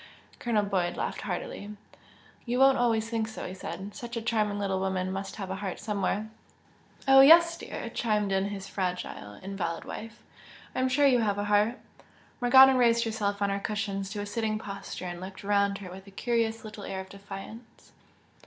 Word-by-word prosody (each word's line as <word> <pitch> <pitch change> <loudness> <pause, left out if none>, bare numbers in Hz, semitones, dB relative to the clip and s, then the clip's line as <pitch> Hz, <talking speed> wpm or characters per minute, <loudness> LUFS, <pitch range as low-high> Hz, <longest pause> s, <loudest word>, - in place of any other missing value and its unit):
Colonel 225 -4 +1
Boyd 185 -3 -1
laughed - - -3
heartily. 210 - -5 0.7
"You 245 +1 0
won't 270 0 +5
always 225 -2 +2
think 225 -1 -1
so!" 220 - -7
he 180 - -6
said 190 +2 -7
"Such 240 0 -6
a - - -2
charming 215 -3 0
little 195 -2 -1
woman 190 -1 -1
must 195 +1 -5
have 195 -3 -5
a 190 - -3
heart 190 -2 -4
somewhere!" 210 0 -1 0.8
"Oh, 270 0 +9
yes, 335 +4 +8
dear!" - - -6
chimed 210 -3 0
in 190 0 +2
his 200 -1 -5
fragile 180 - -4
invalid 185 -4 -3
wife, 225 +2 -8 0.5
"I - - -2
am 260 0 +2
sure 285 +3 +3
you 255 -3 +5
have 205 -3 +1
a 205 - -1
heart!" 210 +4 +2 0.6
Morgana 265 +2 +8
raised 235 -2 +4
herself 205 -3 -1
on 200 - +1
her 200 - -1
cushions 200 -2 -3
to 205 0 -4
a - - -4
sitting 215 0 -1
posture 200 -3 -7
and 175 0 -5
looked 190 +2 -8
round 200 0 +2
her 185 -3 -9
with 190 +2 -11
a - - -10
curious 225 +2 -1
little 210 -1 -8
air 190 -1 -4
or - - -6
defiance. 200 +4 -11
205 Hz, 190 wpm, -28 LUFS, 195-230 Hz, 0.8 s, Oh